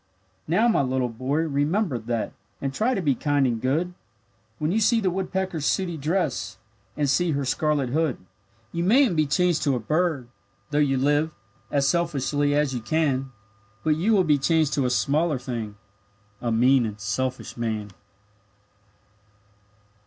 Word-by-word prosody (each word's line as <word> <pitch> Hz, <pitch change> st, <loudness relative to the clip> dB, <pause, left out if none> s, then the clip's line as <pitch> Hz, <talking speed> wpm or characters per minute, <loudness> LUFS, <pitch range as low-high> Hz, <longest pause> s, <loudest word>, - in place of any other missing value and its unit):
Now, 210 Hz, +9 st, +3 dB
my 225 Hz, -, +3 dB
little 130 Hz, -2 st, 0 dB
boy, 130 Hz, +7 st, -1 dB
remember 155 Hz, -, 0 dB
that, 115 Hz, 0 st, -3 dB, 0.3 s
And 135 Hz, -1 st, -3 dB
try 240 Hz, -, +1 dB
to 190 Hz, -, -2 dB
be 145 Hz, -3 st, +3 dB
kind 145 Hz, +1 st, +1 dB
and 115 Hz, -3 st, -1 dB
good, 160 Hz, +8 st, 0 dB, 0.6 s
When 150 Hz, +4 st, -1 dB
you 215 Hz, -, +2 dB
see 230 Hz, +2 st, +3 dB
the 190 Hz, -4 st, 0 dB
woodpecker's 185 Hz, -4 st, -2 dB
sooty 185 Hz, -3 st, 0 dB
dress, 150 Hz, -, -2 dB, 0.4 s
And 145 Hz, -1 st, +1 dB
see 165 Hz, +4 st, +2 dB
her 140 Hz, -1 st, -1 dB
scarlet 145 Hz, 0 st, 0 dB
hood. 155 Hz, 0 st, 0 dB, 0.5 s
You 170 Hz, -, -2 dB
mayn't 230 Hz, +1 st, +4 dB
be 155 Hz, -1 st, +2 dB
changed 175 Hz, +3 st, +2 dB
to 140 Hz, -3 st, +2 dB
a -, -, -1 dB
bird, 155 Hz, +1 st, 0 dB, 0.4 s
though 145 Hz, -, +1 dB
you 135 Hz, -2 st, +2 dB
live 145 Hz, +4 st, +1 dB, 0.3 s
As 140 Hz, -1 st, +1 dB
selfishly 145 Hz, -4 st, +1 dB
as 145 Hz, -2 st, +1 dB
you 125 Hz, -, -3 dB
can; 135 Hz, +1 st, 0 dB, 0.5 s
But 155 Hz, -1 st, +2 dB
you 195 Hz, +8 st, +1 dB
will 195 Hz, -3 st, +4 dB
be 150 Hz, -4 st, +3 dB
changed 160 Hz, +1 st, +2 dB
to 135 Hz, -3 st, +1 dB
a -, -, 0 dB
smaller 140 Hz, +7 st, +1 dB
thing 120 Hz, -5 st, -5 dB, 0.7 s
A 120 Hz, -, -1 dB
mean 125 Hz, +1 st, +4 dB
and 105 Hz, -1 st, -7 dB
a -, -, -28 dB
selfish 125 Hz, +6 st, -3 dB
man. 110 Hz, -3 st, -3 dB
145 Hz, 165 wpm, -25 LUFS, 130-170 Hz, 0.7 s, mayn't